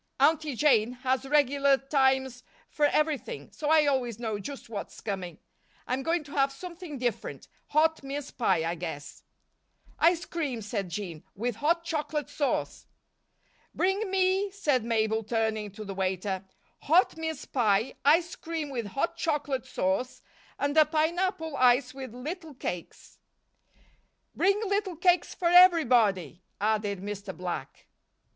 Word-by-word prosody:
Aunty 310 -3 +3
Jane 240 -4 +3
has 260 +1 0
regular 280 -1 +4
times 265 -2 +1 0.3
for 300 - +2
everything, 305 -1 -1
so 300 - -3
I 315 -1 +5
always 255 -6 0
know 220 -3 -3
just 275 +7 -8
what's 210 -3 -7
coming. 185 -5 -5 0.5
I'm 255 +2 -1
going 330 +3 0
to 290 - -14
have 275 -1 +2
something 340 +1 -8
different 245 -2 -3 0.2
hot 320 +2 +2
mince 280 +1 -5
pie, 185 -9 +1
I 170 - -1
guess." 160 -4 -7 0.8
"Ice 340 +1 +3
cream," 275 -10 -3
said 200 -3 -3
Jean, 170 -4 -6
"with 235 +2 -2
hot 335 +6 +1
chocolate 300 -3 -3
sauce." 285 -3 -2 0.9
"Bring 385 +3 +1
me," 380 +1 +2
said 295 - 0
Mabel, 220 -1 0
turning 220 -1 -1
to 215 0 -8
the 195 - -5
waiter, 190 0 -2 0.3
"hot 340 +6 +3
mince 320 -2 -4
pie, 220 -2 +1
ice 330 +4 +3
cream 320 -3 -5
with 235 -5 -3
hot 335 - -2
chocolate 295 -6 -1
sauce 190 +7 -2 0.3
and 285 +1 -1
a 310 - +8
pineapple 320 +1 0
ice 250 +1 +4
with 265 -3 -7
little 310 +4 -6
cakes." 175 -8 -7 1.2
"Bring 395 +2 +2
little 400 -2 -1
cakes 355 +2 +2
for 345 -2 +1
everybody," 245 - +5 0.2
added 205 -2 0
Mr. 200 -1 -6
Black. 175 -7 -5
270 Hz, 140 wpm, -28 LUFS, 220-320 Hz, 1.2 s, a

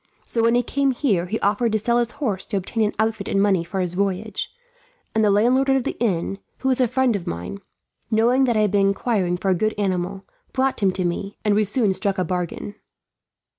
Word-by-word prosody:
So 230 - -1
when 230 +1 +3
he 245 - +3
came 275 +3 0
here, 205 - 0
he 220 +5 -2
offered 215 +3 +1
to - - +4
sell 235 +3 +1
his 240 0 0
horse 210 -10 -3
to 205 - -1
obtain 220 +4 -1
an 210 - 0
outfit 220 -2 -1
and 195 - +1
money 195 -4 +3
for 185 +3 -4
his 180 -1 -2
voyage; 200 +2 -2 0.6
and 220 - +2
the 210 - +4
landlord 245 +7 +3
of 270 -1 +3
the - - -3
inn, 195 -3 -1 0.2
who 265 - 0
is 255 - +1
a 250 - +4
friend 255 -1 +2
of 190 - -5
mine, 85 - -5 0.5
knowing 240 +4 +3
that 240 -3 +1
I - - +3
had 210 -2 +2
been 200 -1 +3
inquiring 195 -3 0
for 190 +2 -1
a - - +5
good 215 +4 0
animal, 190 -1 -2 0.3
brought 265 0 +1
him 200 -3 +3
to 185 -1 -1
me, 195 +3 -3
and 210 - +3
we 215 +1 +3
soon 205 -1 +1
struck 195 0 -1
a 185 - +1
bargain." 180 +2 -3
210 Hz, 230 wpm, -22 LUFS, 190-235 Hz, 0.6 s, a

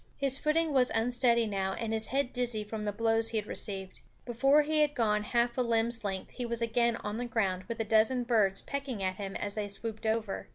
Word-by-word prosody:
His 275 0 +2
footing 315 0 +1
was 255 -2 +4
unsteady 235 0 +2
now 195 -2 -2
and 225 +1 -3
his 220 -1 0
head 270 +1 -1
dizzy 245 -4 0
from 210 0 -6
the 205 - 0
blows 225 +1 +1
he 225 - -2
had 210 - -1
received. 195 -3 -3 0.2
Before 270 +5 +3
he 310 +1 0
had 295 -1 +2
gone 210 -3 +1
half 235 +3 0
a - - +4
limb's 230 -1 0
length 195 -2 -4
he 250 - -5
was 235 0 0
again 235 0 +1
on 210 -1 -5
the 245 - -3
ground, 195 -6 -1
with 230 -1 -6
a - - +1
dozen 225 +4 +3
birds 215 -5 +2
pecking 275 -7 -4
at 185 0 -1
him 195 -1 -5
as 205 -1 -3
they 210 -1 -3
swooped 220 +2 -4
over. 220 -2 -2
230 Hz, 230 wpm, -30 LUFS, 210-245 Hz, 0.2 s, was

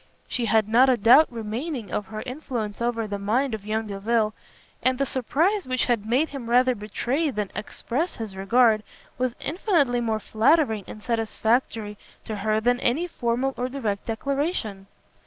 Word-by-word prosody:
She 245 - -1
had 220 -2 +3
not 245 +4 +5
a 255 - +4
doubt 250 +9 +6
remaining 230 - -4
of 210 - -2
her 215 +1 -6
influence 245 -6 -4
over 235 -1 0
the 205 -1 -4
mind 235 +6 0
of 210 -1 -6
young 220 +1 -1
Delvile, 215 +2 0 0.5
and 255 0 +2
the 275 - +1
surprise 315 - 0
which 255 -1 +1
had 230 -4 0
made 265 +8 +2
him 260 -5 -7
rather 250 +1 +4
betray 245 +8 -1
than 210 -6 -3
express 275 +10 -3
his 220 -4 -6
regard, 220 +3 +3 0.4
was 250 -1 0
infinitely 290 - +1
more 220 -2 0
flattering 220 - +2
and 215 - -10
satisfactory 225 -2 -1 0.3
to 215 - -4
her 215 +2 +1
than 245 +2 +2
any 275 +10 +1
formal 260 -4 -1
or 250 +1 -2
direct 225 -7 -3
declaration. 230 - -2
235 Hz, 165 wpm, -25 LUFS, 215-260 Hz, 0.5 s, doubt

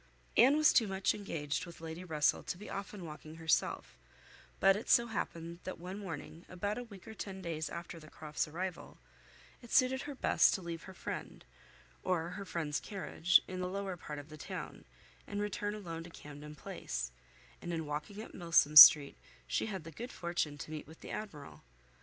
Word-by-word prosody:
Anne 270 +5 +7
was 310 0 +6
too 225 - +5
much 195 0 +1
engaged 165 -4 -3
with 170 - -11
Lady 165 +2 -6
Russell 155 -4 +2
to - - -4
be 210 - -9
often 200 -2 -6
walking 155 0 -9
herself; 160 - 0 0.6
but 195 0 +6
it 210 - -5
so 235 - +6
happened 170 -7 -4
that 185 - -5
one 185 +4 -7
morning, 165 -3 -7
about 205 +5 -2
a - - -5
week 200 -6 -13
or 220 - -7
ten 195 -3 -6
days 165 -3 -3
after 170 0 -7
the 155 -1 -13
Croft's 155 -1 -3
arrival, 175 +3 -5 0.6
it 240 - -13
suited 265 0 +4
her 290 -1 -6
best - - +4
to 190 - -4
leave 170 -1 -6
her 190 - -10
friend, - - -6 0.6
or 170 -2 0
her 200 +2 -6
friend's 160 -5 -2
carriage, 190 -3 +2
in 185 0 -5
the 180 0 -2
lower 195 -1 -3
part 150 -3 -7
of 145 +1 -9
the 155 - -10
town, - - -7 0.4
and 205 - -3
return 205 0 -2
alone 170 -6 -6
to 170 - -10
Camden 150 -1 -10
Place, - - -5 0.5
and 175 - -5
in 165 -2 -2
walking 150 +9 -5
up - - -12
Milsom 165 -4 +3
Street 140 0 +11 0.3
she - - -1
had 190 -6 -4
the 165 - -9
good 240 +8 -7
fortune 170 -4 -2
to 150 - -8
meet 155 -2 -6
with 160 +1 -14
the - - -8
Admiral. 160 -10 -7
175 Hz, 195 wpm, -34 LUFS, 155-200 Hz, 0.6 s, Street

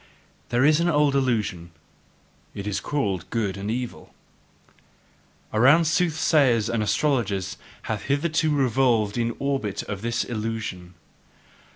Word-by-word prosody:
There 120 +3 +2
is 155 +1 +5
an 170 +1 +2
old 150 -3 +3
illusion 110 -10 -1 0.9
it 100 - -6
is 105 -1 -1
called 100 - -2
good 105 -5 -1
and 100 +1 -5
evil. 120 +1 -5 1.4
Around 140 +10 +5
soothsayers 155 - +2
and 115 -2 0
astrologers 105 -5 0 0.3
hath 110 -2 -4
hitherto 155 +2 +1
revolved 125 -6 +2
the 115 0 0
orbit 135 -8 -2
of 100 -2 -6
this 120 +1 -1
illusion. 105 -6 -5
120 Hz, 115 wpm, -24 LUFS, 105-145 Hz, 1.4 s, is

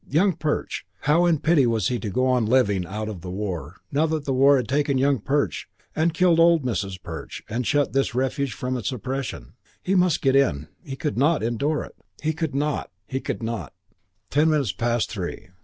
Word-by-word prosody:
Young 180 +7 +3
Perch! 150 0 -2 0.2
How 165 +5 +3
in 160 -4 +2
pity 155 -6 +4
was 110 -5 +1
he 125 -1 -1
to 110 - -4
go 130 +6 +1
on 125 -4 +2
living 105 -7 +2
out 105 +4 -4
of 100 -6 -6
the 90 - -7
war, 90 -5 -4 0.2
now 150 +3 +2
that 155 -2 -2
the 135 - 0
war 135 +2 +5
had 125 -4 -2
taken 140 +2 +1
Young 135 0 +2
Perch 140 +7 -1 0.3
and 160 +2 +2
killed 170 0 +3
old 165 -2 +5
Mrs. 100 -6 -2
Perch - - -7
and 120 +2 -2
shut 145 -1 +1
this 135 -2 +1
refuge 135 +1 0
from 125 +2 -3
its 120 - -2
oppression? 130 - -5 0.3
He 190 - 0
must 180 -4 +2
get 135 -1 +3
in. 80 - +2
He 135 - -6
could 145 -2 -2
not 150 -1 +3
endure 140 +7 0
it. - - -12 0.2
He 155 +1 -1
could 160 -3 -3
not, 150 +1 -1 0.3
could - - -4
not.... 115 -4 -4 0.6
Ten 150 +3 +4
minutes 145 -9 +1
past 120 -1 -1
three. 95 -2 -5
135 Hz, 205 wpm, -24 LUFS, 115-150 Hz, 0.6 s, war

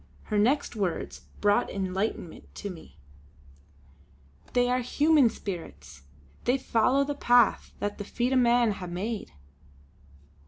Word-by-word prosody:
Her 210 -2 -1
next 255 +5 +1
words 195 -5 -3
brought 205 0 +3
enlightenment 190 -2 -4
to 205 - -5
me: 160 - -13 1.6
"They 245 0 +3
are 250 +1 +1
human 285 +1 +3
spirits; 75 - -8 0.4
they 250 +2 +3
follow 260 +1 +2
the 290 +1 -2
path 245 -6 +3
that 205 +1 -4
the - - -3
feet 240 +5 -1
o' - - +4
men 240 -2 +4
hae 190 -3 -6
made!" 200 +5 -4
220 Hz, 125 wpm, -27 LUFS, 190-250 Hz, 1.6 s, o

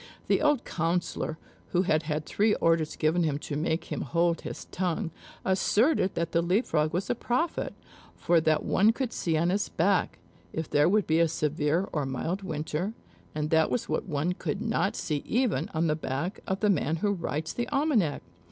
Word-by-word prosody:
The - - +3
old 295 -4 +2
councillor, 165 -1 -1 0.4
who 180 +1 +3
had 155 -4 +2
had 155 -1 -3
three 210 +1 +2
orders 165 -2 +1
given 160 +3 +2
him 155 -4 +1
to 145 0 -5
make 160 +2 0
him 150 - -2
hold 170 +5 +1
his - - -7
tongue, 180 0 -1 0.3
asserted 195 - +2
that 170 -1 -1
the 170 - +2
Leap 185 +8 +2
frog 155 -1 +1
was 180 +3 -1
a - - +3
prophet; 250 +7 -1 0.4
for 170 -1 +3
that 155 -1 +2
one 215 +4 +4
could 250 -1 -3
see 165 -2 0
on 170 +3 +2
his 200 +2 0
back, 190 +3 +1 0.4
if 160 0 -3
there 145 +3 +3
would 210 +1 +3
be 160 +1 +2
a 170 - +5
severe 155 +3 0
or 145 -3 -1
mild 165 +9 -2
winter, 165 +3 -3 0.4
and 150 0 -2
that 160 -1 +4
was 245 - -1
what 155 - -2
one 155 +4 0
could 195 - -3
not 220 -3 0
see 150 - -1
even 245 -3 0
on 160 +1 0
the 155 -2 +2
back 155 +5 -3
of 190 +1 -2
the 210 - +3
man 155 -3 +1
who 205 +5 0
writes 160 -4 -3
the 240 0 -2
almanac. 260 - +1
170 Hz, 195 wpm, -28 LUFS, 155-200 Hz, 0.4 s, a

